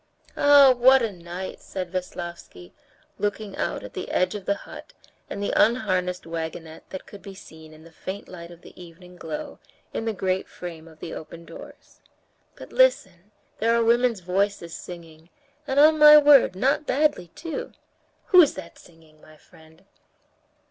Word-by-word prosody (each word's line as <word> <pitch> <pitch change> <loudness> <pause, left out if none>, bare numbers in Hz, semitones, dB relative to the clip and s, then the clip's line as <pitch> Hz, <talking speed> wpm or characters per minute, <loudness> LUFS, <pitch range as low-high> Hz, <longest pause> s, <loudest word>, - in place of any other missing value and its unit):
"Ah, 285 -2 +6
what 260 +1 +5
a 225 - -1
night!" 175 +1 -8
said 185 -2 -6
Veslovsky, 175 - -7 0.5
looking 205 -1 -3
out - - -3
at - - -10
the 185 - -6
edge 185 +1 0
of 205 -3 -7
the 200 - 0
hut - - -12 0.4
and 200 - -5
the - - -2
unharnessed 185 -7 +1
wagonette 160 -1 -7
that 190 - -8
could 205 - -13
be 195 -1 -11
seen 160 -4 -14
in 155 0 -16
the 165 - -16
faint 190 +5 -8
light 170 -2 -10
of 170 -1 -15
the - - -15
evening 180 +1 -14
glow 160 -3 -7 0.3
in 225 - -4
the 225 - 0
great 190 -1 -2
frame 165 -2 -9
of 160 -1 -18
the 165 - -7
open 170 +1 -10
doors. - - -14 0.5
"But - - -13
listen, 200 - +2 0.3
there 230 +1 +2
are 235 - +2
women's 235 -2 +2
voices 185 -1 -2
singing, 165 -2 -11 0.4
and, 270 0 +1
on 310 +1 +6
my 300 0 +10
word, 290 -9 +6
not 275 +9 0
badly 280 - +1
too. 320 +1 -6 0.6
Who's 360 -8 +6
that 185 -3 -10
singing, 160 -2 -21
my 155 0 -18
friend?" 160 -1 -21
185 Hz, 165 wpm, -24 LUFS, 170-235 Hz, 0.6 s, my